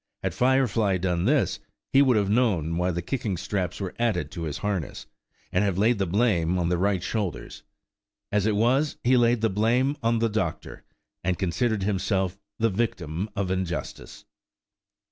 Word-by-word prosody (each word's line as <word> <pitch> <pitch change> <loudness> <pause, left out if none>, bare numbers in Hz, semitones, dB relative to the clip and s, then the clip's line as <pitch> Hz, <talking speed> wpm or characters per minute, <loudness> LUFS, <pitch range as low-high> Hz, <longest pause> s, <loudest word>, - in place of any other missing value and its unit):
Had - - -1
Firefly 125 -6 +2
done 90 -1 -1
this, 140 +2 +2 0.3
he 135 - +7
would 130 -5 +4
have 100 -2 +1
known 100 -8 +1
why 90 +1 +1
the 85 -1 -2
kicking 105 -3 -2
straps 90 0 -3
were 95 -3 -4
added 95 -11 0
to 85 -2 -5
his 75 -2 -4
harness, 100 -7 -3 0.5
and 90 - +2
have 100 -3 0
laid 110 +2 +3
the 95 - 0
blame 90 -3 +1
on 85 -1 0
the 90 - +1
right 95 -1 +1
shoulders. 100 -3 -4 0.7
As 105 0 +1
it 105 - +1
was, 130 +8 +2
he 125 +2 +4
laid 120 -2 +3
the 115 - +2
blame 120 +7 +2
on 115 0 +2
the 115 0 +2
doctor, 105 -7 -3 0.4
and 90 -1 0
considered 100 +4 0
himself 95 -1 -1 0.2
the 115 0 +1
victim 95 -3 -2
of 95 -2 -1
injustice. 90 -3 -4
100 Hz, 170 wpm, -26 LUFS, 90-115 Hz, 0.7 s, he